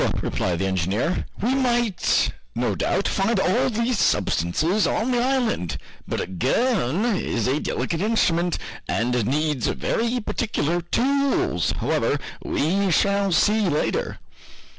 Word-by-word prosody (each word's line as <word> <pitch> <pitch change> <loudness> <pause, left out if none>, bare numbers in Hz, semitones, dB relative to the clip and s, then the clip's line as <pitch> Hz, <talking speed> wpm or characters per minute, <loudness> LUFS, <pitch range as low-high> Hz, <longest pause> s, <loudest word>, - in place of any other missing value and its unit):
replied 90 -2 -1
the 95 - -1
engineer, 95 - -1 0.2
"we 245 +4 +2
might, 240 -7 +1 0.2
no - - 0
doubt, - - 0
find 200 +2 +1
all 210 +8 +2
these 235 -1 0
substances 160 - +1
on 240 +4 0
the 245 -1 +2
island, 245 - 0 0.3
but - - -2
a - - -1
gun 190 - 0
is 115 - -1
a 135 +4 +1
delicate 165 +2 -2
instrument, 180 -6 +1 0.3
and 120 -1 0
needs 150 -2 0
very 235 +2 -1
particular 175 -7 -1
tools. 275 - +1
However, - - 0 0.2
we 190 +6 0
shall 200 +3 +2
see 210 +3 +3
later!" 150 0 -1
190 Hz, 125 wpm, -23 LUFS, 145-235 Hz, 0.3 s, see